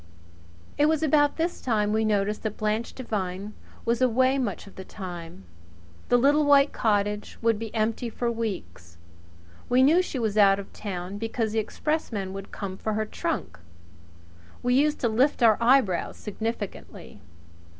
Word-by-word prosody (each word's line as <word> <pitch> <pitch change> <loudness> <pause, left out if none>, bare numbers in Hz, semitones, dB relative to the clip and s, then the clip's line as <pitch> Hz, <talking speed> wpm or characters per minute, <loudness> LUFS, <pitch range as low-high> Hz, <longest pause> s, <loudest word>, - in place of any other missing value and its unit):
It 295 - +5
was 315 0 +1
about 290 -1 +3
this 335 +2 -2
time 210 -4 +1
we 220 0 +2
noticed 210 -1 0
that 220 -2 -4
Blanche 215 +2 -1
Devine 205 -4 -4 0.3
was 235 +1 0
away 255 +2 +3
much 225 -7 -3
of 200 - -15
the 190 - -8
time. 175 - -8 0.7
The 245 - +5
little 285 +4 +4
white 285 -1 +5
cottage 210 -2 0
would 225 -2 +2
be 225 -1 -5
empty 225 +2 0
for 240 - -5
a 235 - +2
week. 215 - -4 0.9
We 255 +1 +5
knew 320 +7 +5
she 355 - -5
was 220 -3 0
out 195 -1 +6
of 200 - -9
town 190 -1 -5
because 225 0 -2
the 220 - 0
expressman 215 -5 -2
would 195 0 -8
come 190 -2 -6
for 215 - -2
her 215 +1 -1
trunk. 215 - -4 1.0
We 245 0 +2
used 295 +3 +3
to 235 - +2
lift 250 +4 +2
our 220 -2 +5
eyebrows 235 -7 +3
significantly. 205 - -6
220 Hz, 160 wpm, -26 LUFS, 205-255 Hz, 1.0 s, out